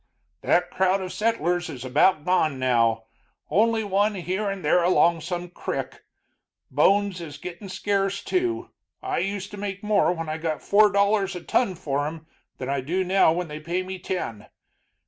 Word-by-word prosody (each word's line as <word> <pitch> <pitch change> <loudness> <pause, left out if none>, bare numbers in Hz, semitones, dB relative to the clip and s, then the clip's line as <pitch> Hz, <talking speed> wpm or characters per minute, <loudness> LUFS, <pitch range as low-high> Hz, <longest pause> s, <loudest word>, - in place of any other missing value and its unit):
"That 175 0 +2
crowd 190 +1 +2
of 185 -1 -5
settlers 180 -6 0
is 130 -4 -7
about 145 +9 +4
all 150 - -21
gone 160 -5 +2
now, 115 -3 +2 0.5
only 225 +2 +3
one 205 +1 +1
here 190 +3 -2
and 195 -4 -5
there 175 +4 +4
along 170 -1 +3
some 175 +2 -4
crick. 175 - -5 0.7
Bones 200 -2 +2
is 150 -4 -8
gittin' 180 +5 -8
scarce, 195 +1 -1
too. 355 -1 -1 0.3
I 385 0 -1
used 200 +1 -3
to 205 - -8
make 200 0 -5
more 210 -3 +3
when 165 -2 -4
I 155 +1 -3
got 160 -2 -3
four 210 0 +5
dollars 200 -1 +2
a 175 - -7
ton 195 -2 +1
for 145 -4 -2
'em 160 0 -7 0.3
than 130 - -5
I 140 0 -1
do 175 +8 -1
now 185 -2 +4
when 175 +1 -2
they 150 0 -7
pay 170 +4 -2
me 190 0 -6
ten. 115 - -4
185 Hz, 180 wpm, -25 LUFS, 160-200 Hz, 0.7 s, four